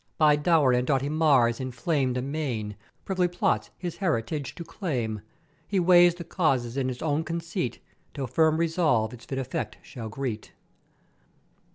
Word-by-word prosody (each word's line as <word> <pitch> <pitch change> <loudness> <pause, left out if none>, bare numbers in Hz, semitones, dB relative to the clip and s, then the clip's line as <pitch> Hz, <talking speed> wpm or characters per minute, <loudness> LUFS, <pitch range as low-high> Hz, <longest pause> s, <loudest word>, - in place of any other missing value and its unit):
by 150 -2 +5
dour 150 -3 +3
and 125 +1 +1
doughty 135 0 +1
Mars 140 -7 +3
inflamed 130 +1 -1
amain, 125 -6 -3 0.3
privily 185 -2 +1
plots 175 0 0
his 175 -2 -5
heritage 150 - -2
to 170 - -6
claim: 130 - -3 0.5
He 200 - +1
weighs 175 -1 +6
the 175 - -7
causes 130 -9 0
in 135 -2 0
his 125 +1 -4
own 155 0 +1
conceit 165 - -3 0.4
till 140 -2 -2
firm 155 +5 +2
Resolve 160 -10 +1
its 120 - -11
fit 135 - -4
effect 130 -1 -3
shall 115 -4 -8
greet. 115 -2 -5
145 Hz, 150 wpm, -27 LUFS, 125-165 Hz, 0.5 s, weighs